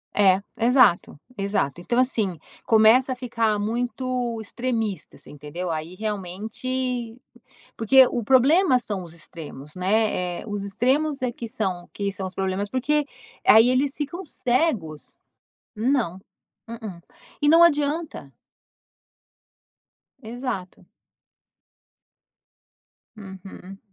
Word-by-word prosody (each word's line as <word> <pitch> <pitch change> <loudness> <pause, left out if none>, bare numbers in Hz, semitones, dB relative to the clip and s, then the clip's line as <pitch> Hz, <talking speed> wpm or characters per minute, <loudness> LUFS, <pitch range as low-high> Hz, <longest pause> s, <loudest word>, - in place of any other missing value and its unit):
É. 195 -1 +4 0.2
Exato, 235 - +3 0.2
exato. 195 -6 -1
Então 240 +7 -1
assim, 220 -9 +1 0.3
começa 225 +4 +5
a - - -4
ficar 230 -4 0
muito 245 +2 -2
extremista, 225 -2 -3
você - - -11
entendeu? 150 +5 -6
Aí 160 +2 -4
realmente 225 +5 -4 0.6
porque 260 +4 +6
o 240 - -3
problema 265 - +4
são 205 -6 -4
os 165 - -12
extremos, 155 -3 -11
né? 185 -2 0
Eh. - - -11
Os 205 -2 -4
extremos 270 +8 0
é 250 -1 -1
que 230 -1 -7
são 190 -7 -3
que 200 -1 -3
são 190 0 -4
os 185 - -13
problemas, 190 +2 -2
porque 290 +4 0 0.4
aí 225 +3 +7
eles 270 +2 +1
ficam 310 +6 -5
cegos. 240 - -1 0.6
Não, 220 -5 0 0.5
mm-mm. 220 -7 -8 0.4
E 290 - +2
não 330 +3 +7
adianta. 305 0 +1 1.9
Exato. 225 -5 -6 2.3
Uhum. 195 -1 -11
225 Hz, 110 wpm, -24 LUFS, 190-255 Hz, 2.3 s, aí